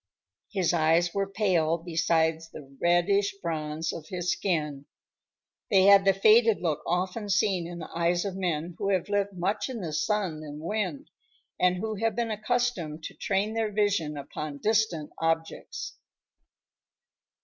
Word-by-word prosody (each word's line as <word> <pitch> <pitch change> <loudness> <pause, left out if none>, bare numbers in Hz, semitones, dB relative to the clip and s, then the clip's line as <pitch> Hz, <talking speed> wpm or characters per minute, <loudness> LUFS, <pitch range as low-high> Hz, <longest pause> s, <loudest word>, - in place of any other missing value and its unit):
His 185 -5 +1
eyes 165 +1 +3
were 195 -1 -1
pale 175 -6 +2
beside 165 -1 +1
the 140 -2 -12
reddish 195 +4 +2
bronze 160 -2 -3
of 155 -2 -8
his 180 0 -2
skin. 150 -7 -1 0.8
They 195 -3 +5
had 200 0 +7
the 195 - +5
faded 220 +1 +5
look 160 -4 -1
often 185 +4 -1
seen 195 -4 +1
in 175 0 -7
the 160 - -7
eyes 175 +2 +1
of 195 -2 -3
men 175 -3 -2
who 200 - -1
have 190 -1 0
lived 200 -1 0
much 190 +7 -1
in 250 -3 -5
the 165 -4 -4
sun 175 -1 -1
and 150 -1 -8
wind 215 - -3 0.5
and 180 0 +3
who 220 +2 -3
have 225 +2 0
been 235 -1 -1
accustomed 215 -8 -1
to - - -6
train 205 +1 -1
their 225 -1 -1
vision 200 -8 0
upon 145 +1 -6
distant 210 -5 0
objects. 165 0 -2
180 Hz, 150 wpm, -27 LUFS, 160-205 Hz, 0.8 s, had